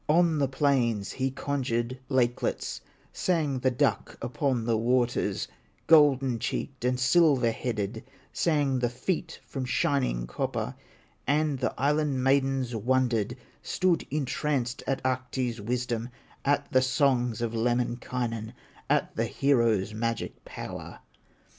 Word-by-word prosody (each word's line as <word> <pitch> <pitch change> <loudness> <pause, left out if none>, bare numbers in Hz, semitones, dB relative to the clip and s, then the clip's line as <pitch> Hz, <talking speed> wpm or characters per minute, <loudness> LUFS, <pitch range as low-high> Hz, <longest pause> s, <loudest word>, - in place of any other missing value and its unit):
On 165 -1 +4
the 140 - +3
plains 125 -7 +1
he 135 0 -1
conjured 130 -3 -2
lakelets, 125 -3 0 0.3
Sang 155 -7 0
the 130 - +2
duck 125 - 0
upon 125 -2 -1
the 115 -1 +2
waters, 120 +2 +1 0.4
Golden 135 -6 +5
cheeked 130 +2 -3
and 125 0 +1
silver 135 -3 +4
headed, 110 -2 -3 0.3
Sang 145 -5 +1
the 120 -1 +1
feet 160 +7 -3
from 135 - -4
shining 125 - 0
copper; 60 - -3 0.5
And 145 0 +1
the 130 - -1
Island 145 -1 +1
maidens 135 -2 +2
wondered, 120 0 +1 0.2
Stood 185 -3 +1
entranced 135 -3 -1
at 135 - -1
Ahti's 130 -2 -1
wisdom, 120 +1 -2 0.3
At 145 +1 +1
the 130 - +5
songs 130 -3 +2
of 115 -1 -2
Lemminkainen, 120 -1 -1 0.4
At - - +1
the - - +1
hero's 115 -7 +2
magic 115 +1 -3
power. - - -8
130 Hz, 120 wpm, -28 LUFS, 120-140 Hz, 0.5 s, Golden